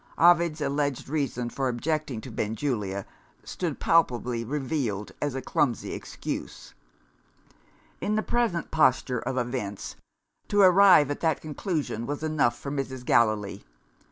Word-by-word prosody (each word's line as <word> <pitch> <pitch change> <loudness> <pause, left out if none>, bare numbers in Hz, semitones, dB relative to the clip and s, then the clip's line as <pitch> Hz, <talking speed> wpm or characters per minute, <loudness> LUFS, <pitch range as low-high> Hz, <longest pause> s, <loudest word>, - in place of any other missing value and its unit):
Ovid's 170 -1 +4
alleged 140 -2 -1
reason 130 -5 -2
for 135 -1 -1
objecting 140 0 -2
to 130 - -9
Benjulia 105 -3 -2 0.4
stood 170 -6 -4
palpably 125 -7 +2
revealed 130 -6 -2
as 145 -3 -1
a 135 - -4
clumsy 125 -4 0
excuse. - - -6 1.3
In 210 - -1
the 215 - +1
present 235 -8 0
posture 130 -4 +2
of 130 +2 -3
events, 120 -5 -3 0.5
to 205 - +1
arrive 185 -6 +7
at 145 - -3
that 160 -3 +1
conclusion 150 - -3
was 145 +1 -4
enough 150 -7 +1
for 140 - -6
Mrs. 130 -3 -4
Gallilee. 105 -4 +2
135 Hz, 130 wpm, -27 LUFS, 120-155 Hz, 1.3 s, arrive